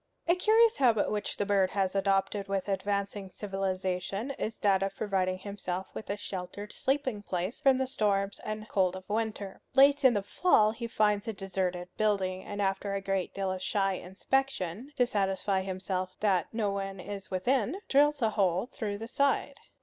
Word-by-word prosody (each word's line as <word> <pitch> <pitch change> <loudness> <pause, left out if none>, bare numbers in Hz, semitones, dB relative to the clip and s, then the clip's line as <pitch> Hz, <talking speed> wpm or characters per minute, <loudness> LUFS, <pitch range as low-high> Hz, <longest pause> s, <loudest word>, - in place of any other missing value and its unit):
A 340 - +6
curious 440 +5 +4
habit 235 -6 +3
which 210 -1 -2
the 205 - 0
bird 195 -2 +3
has 190 -1 0
adopted 195 0 +1
with 195 -1 -1
advancing 200 0 -2
civilization 195 +3 -2
is 220 0 -3
that 195 -2 +3
of 195 0 -1
providing 190 -3 0
himself 190 -2 -4
with 215 - -7
a 200 - -1
sheltered 200 +1 -6
sleeping 260 -5 -1
place 185 +2 -3
from 270 -2 +4
the 265 - +1
storms 200 -5 0
and 215 0 -5
cold 185 -3 +1
of 185 0 -9
winter. 210 -2 -3
Late 280 +1 +6
in 255 -3 +6
the 200 - 0
fall 215 - +4
he 235 +1 -5
finds 210 -1 +1
a 225 - -1
deserted 185 -2 -2
building, 190 -3 +1
and 205 0 -3
after 195 +1 -1
a - - 0
great 195 -1 -2
deal 195 -1 -1
of 185 0 -4
shy 195 0 +1
inspection, 200 - -2
to 245 - +4
satisfy 195 -4 0
himself 185 -1 -3
that 195 -4 +2
no 220 -3 0
one 195 -1 -4
is 195 +1 -7
within, 245 - 0
drills 290 -1 +4
a 220 - +3
hole 190 -2 +1
through 215 -5 -4
the 225 +2 -6
side. 280 +3 +1
200 Hz, 180 wpm, -30 LUFS, 190-220 Hz, -, A